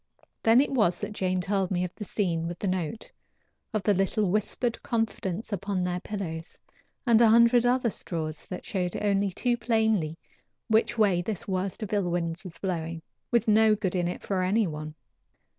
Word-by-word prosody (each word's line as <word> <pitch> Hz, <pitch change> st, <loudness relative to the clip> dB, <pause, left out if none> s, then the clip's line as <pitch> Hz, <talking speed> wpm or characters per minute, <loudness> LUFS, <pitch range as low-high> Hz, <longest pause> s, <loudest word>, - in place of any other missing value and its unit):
Then 225 Hz, +2 st, +6 dB
it 285 Hz, -, -1 dB
was 210 Hz, -10 st, +2 dB
that 210 Hz, 0 st, -4 dB
Jane 185 Hz, -2 st, 0 dB
told 195 Hz, -1 st, 0 dB
me 180 Hz, -1 st, 0 dB
of 180 Hz, -, -4 dB
the 210 Hz, -, -7 dB
scene 170 Hz, -5 st, -1 dB
with 175 Hz, 0 st, -5 dB
the 200 Hz, -, -3 dB
note, 185 Hz, +3 st, -3 dB, 0.6 s
of 215 Hz, -3 st, -1 dB
the 205 Hz, -, +4 dB
little 195 Hz, +1 st, +1 dB
whispered 215 Hz, +3 st, -1 dB
confidence 225 Hz, -3 st, -2 dB
upon 195 Hz, -1 st, -1 dB
their 180 Hz, 0 st, -1 dB
pillows, 175 Hz, -5 st, -6 dB, 0.5 s
and 235 Hz, -2 st, +5 dB
a 235 Hz, -, +7 dB
hundred 235 Hz, +1 st, +5 dB
other 245 Hz, -2 st, +2 dB
straws 155 Hz, -5 st, -4 dB
that 180 Hz, -, -7 dB
showed 180 Hz, -3 st, -2 dB
only 200 Hz, -1 st, +1 dB
too 240 Hz, +6 st, 0 dB
plainly 220 Hz, -8 st, +1 dB, 0.5 s
which 225 Hz, +1 st, +2 dB
way 195 Hz, -5 st, +3 dB
this 215 Hz, +4 st, -4 dB
worst 190 Hz, +3 st, -2 dB
of 215 Hz, -, -5 dB
ill 200 Hz, -4 st, +1 dB
winds 170 Hz, 0 st, -2 dB
was 170 Hz, -3 st, -8 dB
blowing 165 Hz, -3 st, -3 dB, 0.3 s
with 235 Hz, -2 st, +2 dB
no 215 Hz, 0 st, +5 dB
good 200 Hz, -4 st, -2 dB
in 175 Hz, -1 st, +1 dB
it 175 Hz, -, -5 dB
for 190 Hz, -2 st, -1 dB
any 205 Hz, +4 st, +2 dB
one. 155 Hz, -2 st, -6 dB
195 Hz, 185 wpm, -27 LUFS, 175-220 Hz, 0.6 s, a